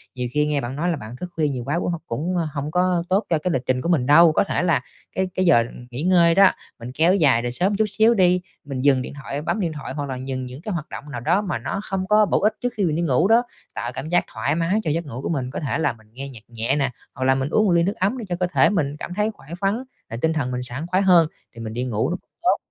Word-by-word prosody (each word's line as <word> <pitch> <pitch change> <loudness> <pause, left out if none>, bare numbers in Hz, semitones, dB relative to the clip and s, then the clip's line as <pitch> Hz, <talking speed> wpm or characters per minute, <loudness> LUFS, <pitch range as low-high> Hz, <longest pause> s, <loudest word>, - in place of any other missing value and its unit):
nhiều 125 -1 -2
khi 150 +3 +2
nghe 150 -2 0
bạn 120 +2 -5
nói 165 +5 -1
là 170 - +1
bạn 115 -4 -8
thức 180 +8 -6
khuya 155 -2 +1
nhiều 130 -4 -3
quá 150 +7 -1
cũng 175 - -1
hông 170 -2 -4
cũng, 160 +10 -2
ơ, 165 -2 0
hông 145 +1 -3
có 180 0 +2
tốt 195 +4 +2
cho 165 - +3
cái 180 +4 -2
lịch 130 - 0
trình 125 0 0
của 170 - -2
mình 155 -8 +2
đâu. 160 +4 +7
Có - - +2
thể 185 - -1
là 170 -2 +2 0.3
cái 190 0 0
cái 185 - 0
giờ 145 -9 +5 0.3
nghỉ 125 +3 -4
ngơi 170 -2 +5
đó, 195 -1 +7 0.3
mình 120 +1 -7
kéo 165 +7 +3
dài 140 -11 +4
rồi 120 0 -2
sớm 185 +10 +1
chút 220 - +3
xíu 220 +3 +3
đi, 180 -3 +3 0.2
mình 135 -2 -4
dừng 135 -1 +4
điện 125 - -6
thoại 140 +1 -4
bấm 165 - -1
điện 175 -5 -1
thoại 150 - -6
hoặc 145 -2 -4
là 130 - -3
dừng 130 -1 -3
những 125 +3 -9
cái 205 +3 -4
hoạt 170 -3 -4
động - - -7
nào 120 - -4
đó 170 - +2
mà 180 - -3
nó 135 - -3
không 190 -2 -3
có 210 +1 +5
bổ 180 - +1
ích 215 +1 +3
trước 245 0 -1
khi 205 - 0
mình 155 -3 0
đi 170 - 0
ngủ 160 +1 +2
đó, 230 +3 +5 0.3
tạo 120 - -4
cảm 140 +4 -5
giác 175 +1 +3
thoải 125 +7 -1
mái 170 +5 +1
cho 155 - 0
giấc 165 +2 -1
ngủ 130 -3 -7
của - - -3
mình. 135 -6 -2
Có - - -4
thể 145 - -2
là 160 - +1
mình 110 -2 -21
nghe 135 +3 -7
nhạc 115 -5 -12
nhẹ 115 +3 -1
nè, 135 -2 0 0.2
hoặc 130 - -3
là 130 0 +4
mình 135 +1 -1
uống 215 +4 +3
ly 170 -1 +4
nước 200 +4 -1
ấm 200 +6 0
để 235 - -5
cho 175 - 0
cơ 180 - +1
thể 130 - +5
mình 150 -8 0
cảm 180 - -6
thấy 210 +3 0
khỏe 135 - -19
khoắn 200 +6 0 0.3
và 115 - -5
tinh 160 0 +2
thần 140 -6 -1
mình 125 0 -2
sảng 130 +6 -3
khoái 185 +2 +1
hơn, 175 -4 +6 0.3
thì 115 - -8
mình 110 -1 -5
đi 120 +2 -2
ngủ 115 -4 -1 0.3
tốt - - +3
155 Hz, 305 wpm, -22 LUFS, 130-180 Hz, 0.3 s, đâu